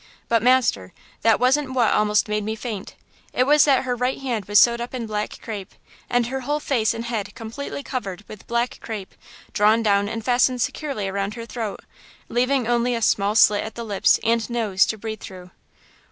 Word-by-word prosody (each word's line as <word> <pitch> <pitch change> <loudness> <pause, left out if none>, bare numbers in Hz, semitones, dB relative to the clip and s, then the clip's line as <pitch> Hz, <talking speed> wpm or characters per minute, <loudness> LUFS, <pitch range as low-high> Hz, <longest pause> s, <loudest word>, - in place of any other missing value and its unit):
But, 230 -1 +2
master, 235 - +2 0.3
that 225 -1 +4
wasn't 260 +2 +2
what 240 -4 +3
almost 210 0 +2
made 210 0 -1
me 220 +1 -3
faint–it 220 +2 -5
was 295 +2 +5
that 275 -3 +3
her 250 -1 -1
right 250 +2 -1
hand 240 -7 -3
was 205 +1 +5
sewed 235 0 +4
up 240 +2 -5
in 240 -2 -3
black 210 -1 -4
crape, 205 -4 -7 0.3
and 245 -1 +2
her 265 +3 -3
whole 290 +3 -2
face 235 -6 0
and 230 +1 -5
head 225 -4 -4
completely 255 +4 -6
covered 205 -9 -5
with 215 - -12
black 235 +1 -1
crape 210 -4 -7 0.4
drawn 215 +2 +3
down 200 -1 +2
and 225 0 -5
fastened 250 0 +2
securely 275 -10 -3
around 200 +2 -3
her 230 -1 -7
throat, 225 -3 -5 0.5
leaving 250 +1 +1
only 240 0 +1
a 230 - -3
small 205 0 +2
slit 210 -2 +5
at 220 - -7
the 235 - -6
lips 205 -3 +3
and 230 -1 +1
nose 215 -5 +2
to 220 - -2
breathe 220 0 -6
through!" 180 -1 -10
230 Hz, 195 wpm, -23 LUFS, 210-250 Hz, 0.5 s, was